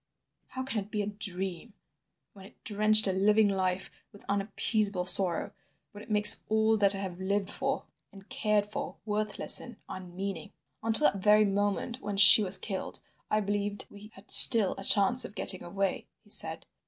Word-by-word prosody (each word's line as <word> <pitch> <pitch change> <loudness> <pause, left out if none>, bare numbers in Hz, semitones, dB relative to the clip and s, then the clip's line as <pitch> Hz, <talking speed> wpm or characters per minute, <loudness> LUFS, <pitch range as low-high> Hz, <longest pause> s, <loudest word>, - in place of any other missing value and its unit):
How 260 - -7
can 260 -4 -5
it 200 - -21
be 210 -1 -4
a - - -5
dream, 200 0 -3 0.6
when 195 -2 -16
it - - -26
drenched 215 +1 +4
a 195 - 0
living 210 +3 +1
life 190 -1 -3 0.2
with 205 - -18
unappeasable 200 -1 -3
sorrow, 180 -2 +2 0.4
when 205 0 -13
it - - -18
makes 210 -1 +5
all 220 0 +1
that 200 -1 +3
I - - -6
have 190 -2 -8
lived 200 +1 -3
for 270 +1 -4 0.3
and 195 0 -17
cared 215 -6 -2
for, 210 - -8
worthless 210 -1 -1
and 240 - -12
unmeaning? 185 -2 -9 0.3
"Until 225 +7 -1
that 195 - -10
very 210 +1 +3
moment 205 +5 -3
when 205 -1 -6
she 205 +2 +8
was 190 -1 0
killed 195 -3 -6 0.3
I 215 - -1
believed 205 0 -4
we 205 +1 -14
had 195 - -10
still 220 -6 +8
a - - -9
chance 205 +6 +3
of 205 - -10
getting 185 - 0
away," 195 +2 -5 0.2
he - - -13
said. - - -4
205 Hz, 180 wpm, -27 LUFS, 195-215 Hz, 0.6 s, she